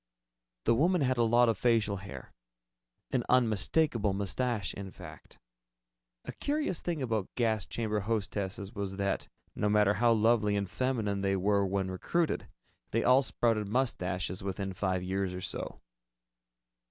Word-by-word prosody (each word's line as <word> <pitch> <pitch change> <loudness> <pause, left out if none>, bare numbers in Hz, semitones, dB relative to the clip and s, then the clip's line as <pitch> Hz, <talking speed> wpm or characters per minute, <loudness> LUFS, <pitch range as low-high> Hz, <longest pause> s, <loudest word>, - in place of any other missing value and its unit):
The 115 - +5
woman 170 +8 +3
had 130 -2 +1
a - - +5
lot 120 +2 +4
of 115 - +1
facial 110 -4 +2
hair 70 -10 -9 0.8
an 125 -2 +1
unmistakable 115 -1 +2
mustache, 100 +2 -1
in 100 -1 -7
fact. - - -12 0.9
A - - -4
curious 290 - -1
thing 165 -5 -2
about 110 -6 -1
gas 110 -5 +1
chamber 110 -2 -1
hostesses 100 -1 -3
was 100 -3 -4
that, 100 0 -1 0.3
no 105 - 0
matter 105 -1 +4
how 120 +2 +3
lovely 110 -2 +3
and 100 -1 -1
feminine 110 -3 -1
they 95 0 +1
were 100 +1 +2
when 95 0 -1
recruited, 165 - -1 0.4
they 115 - 0
all 130 +2 +6
sprouted 115 -5 0
mustaches 95 -7 -1
within 95 0 -3
five 95 -1 -1
years 95 0 -2
or 90 - -5
so. - - -5
105 Hz, 145 wpm, -31 LUFS, 95-120 Hz, 0.9 s, all